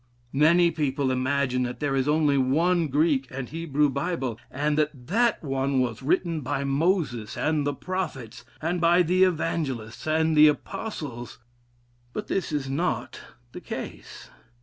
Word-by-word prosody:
Many 170 Hz, +5 st, +5 dB
people 140 Hz, -4 st, -1 dB
imagine 130 Hz, 0 st, 0 dB
that 125 Hz, 0 st, -3 dB
there 145 Hz, -2 st, 0 dB
is 135 Hz, 0 st, +1 dB
only 150 Hz, -1 st, +3 dB
one 160 Hz, +6 st, +2 dB
Greek 145 Hz, -1 st, +1 dB
and 130 Hz, -1 st, -5 dB
Hebrew 150 Hz, -2 st, +1 dB
Bible, 140 Hz, -5 st, -2 dB
and 150 Hz, +2 st, -1 dB
that 150 Hz, -4 st, -1 dB
that 225 Hz, -, +1 dB
one 135 Hz, -1 st, 0 dB
was 120 Hz, -3 st, -1 dB
written 165 Hz, +3 st, 0 dB
by 140 Hz, +1 st, -2 dB
Moses 140 Hz, -, 0 dB
and 150 Hz, -2 st, 0 dB
the 145 Hz, -, 0 dB
prophets, 155 Hz, -, -5 dB, 0.2 s
and 170 Hz, +2 st, -1 dB
by 175 Hz, +1 st, +5 dB
the 180 Hz, +3 st, +3 dB
evangelists 155 Hz, -10 st, -1 dB
and 160 Hz, 0 st, +2 dB
the 150 Hz, 0 st, +8 dB
apostles. 145 Hz, -, -4 dB, 0.8 s
But 210 Hz, -, -4 dB
this 190 Hz, -, -1 dB
is 145 Hz, -3 st, -2 dB
not 135 Hz, -3 st, -2 dB, 0.3 s
the -, -, -9 dB
case. -, -, -8 dB
145 Hz, 150 wpm, -26 LUFS, 130-165 Hz, 0.8 s, the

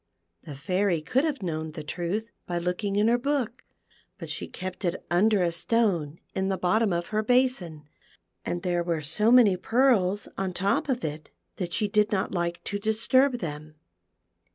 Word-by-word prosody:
The 150 Hz, -, -9 dB
Fairy 180 Hz, +5 st, 0 dB
could 260 Hz, -, +1 dB
have 285 Hz, -9 st, -2 dB
known 160 Hz, -2 st, -3 dB
the 155 Hz, -2 st, -6 dB
truth 185 Hz, +8 st, -3 dB, 0.2 s
by 175 Hz, -, -2 dB
looking 180 Hz, +4 st, -2 dB
in 210 Hz, +2 st, +3 dB
her 240 Hz, +1 st, +3 dB
book, 260 Hz, -3 st, -2 dB, 0.5 s
but -, -, -7 dB
she -, -, -4 dB
kept 185 Hz, +2 st, -7 dB
it 175 Hz, 0 st, -2 dB
under 200 Hz, +2 st, +3 dB
a 170 Hz, -, +1 dB
stone 170 Hz, -5 st, 0 dB, 0.2 s
in 190 Hz, 0 st, -1 dB
the 190 Hz, -, 0 dB
bottom 190 Hz, +4 st, +2 dB
of 170 Hz, 0 st, -2 dB
her 215 Hz, 0 st, 0 dB
basin, 215 Hz, -, +1 dB, 0.6 s
and 175 Hz, 0 st, -3 dB
there 175 Hz, -2 st, 0 dB
were 170 Hz, -3 st, -2 dB
so 210 Hz, +10 st, +2 dB
many 235 Hz, -6 st, +7 dB
pearls 205 Hz, -3 st, +2 dB
on 195 Hz, -1 st, 0 dB
the -, -, -8 dB
top 195 Hz, +9 st, 0 dB
of 255 Hz, -2 st, -1 dB
it 155 Hz, 0 st, -5 dB, 0.3 s
that 180 Hz, -3 st, -3 dB
she 210 Hz, -, 0 dB
did 210 Hz, +1 st, +2 dB
not 190 Hz, -3 st, 0 dB
like 175 Hz, -1 st, -2 dB
to 205 Hz, -, -3 dB
disturb 230 Hz, +6 st, +3 dB
them. 155 Hz, -2 st, -6 dB
190 Hz, 180 wpm, -27 LUFS, 170-220 Hz, 0.6 s, many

